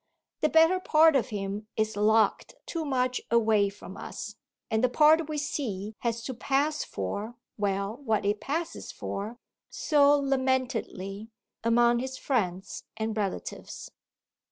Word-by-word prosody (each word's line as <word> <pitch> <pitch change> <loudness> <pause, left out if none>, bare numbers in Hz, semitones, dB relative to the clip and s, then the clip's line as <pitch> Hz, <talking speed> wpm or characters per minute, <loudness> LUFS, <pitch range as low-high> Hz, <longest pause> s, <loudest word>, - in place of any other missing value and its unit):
The 305 - +2
better 325 +4 +5
part 320 -3 +5
of 260 -1 +1
him 205 0 -4
is 220 -1 0
locked 215 +1 +2
too 330 -2 -3
much 255 -2 0
away 220 -3 +3
from 200 +1 -11
us, - - -7 0.4
and 220 +2 +1
the 255 - +4
part 310 +4 +5
we 305 - -2
see 220 -8 -3
has 235 -1 -2
to 260 - -4
pass 285 +5 0
for 205 - -4 0.2
well, 200 +1 -1
what 220 -7 -1
it 205 +1 0
passes 325 +4 -3
for, 215 +4 -5 0.3
so 290 -1 +4
lamentedly, 255 -7 -1 0.3
among 235 +1 +4
his 260 +1 -4
friends 195 -9 -2
and 220 0 -2
relatives. 205 -3 -4
235 Hz, 135 wpm, -28 LUFS, 210-280 Hz, 0.4 s, better